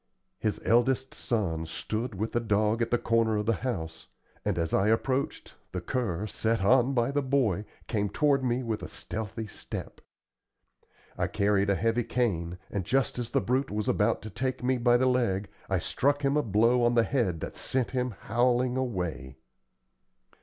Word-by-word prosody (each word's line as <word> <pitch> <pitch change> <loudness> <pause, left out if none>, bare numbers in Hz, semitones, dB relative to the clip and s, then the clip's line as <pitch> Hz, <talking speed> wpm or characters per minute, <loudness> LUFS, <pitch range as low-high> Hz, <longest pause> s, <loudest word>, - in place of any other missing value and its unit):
His 110 - -1
eldest 130 +3 +2
son 85 -9 -2
stood 110 +7 -3
with 110 +4 -2
the 120 - +1
dog 110 0 +1
at 115 - +1
the 120 - +3
corner 115 -2 +2
of 105 - -1
the 115 +1 +1
house, 80 -11 -4 0.4
and 100 -4 -1
as 80 -1 -1
I 95 - +3
approached, 130 +5 0 0.2
the 90 - -1
cur, 100 -2 -2
set 110 0 -1
on 130 +5 +4
by 120 +2 +2
the 145 +1 +1
boy, 130 -8 +1 0.2
came 105 -3 0
toward 140 +3 +2
me 125 0 0
with 115 -3 -2
a - - -6
stealthy 110 0 -5
step. 105 - -8 1.2
I - - +2
carried 100 0 +1
a 100 - +3
heavy 115 +5 +1
cane, 90 -9 -1
and 100 - -2
just 130 +5 0
as 120 -1 -3
the - - +1
brute 130 +3 0
was 105 0 -2
about 105 +2 +1
to 110 - -7
take 130 +3 -2
me 130 0 +1
by 120 0 +4
the 130 - +2
leg, 115 -7 +1 0.2
I 95 - +2
struck 145 - 0
him 135 +1 +2
a 150 - +4
blow 115 +2 +3
on 120 0 +3
the 115 - +5
head 115 - 0
that - - -5
sent 130 -3 -1
him 125 -3 -1
howling 125 +2 +2
away. 85 - -3
115 Hz, 180 wpm, -28 LUFS, 100-125 Hz, 1.2 s, the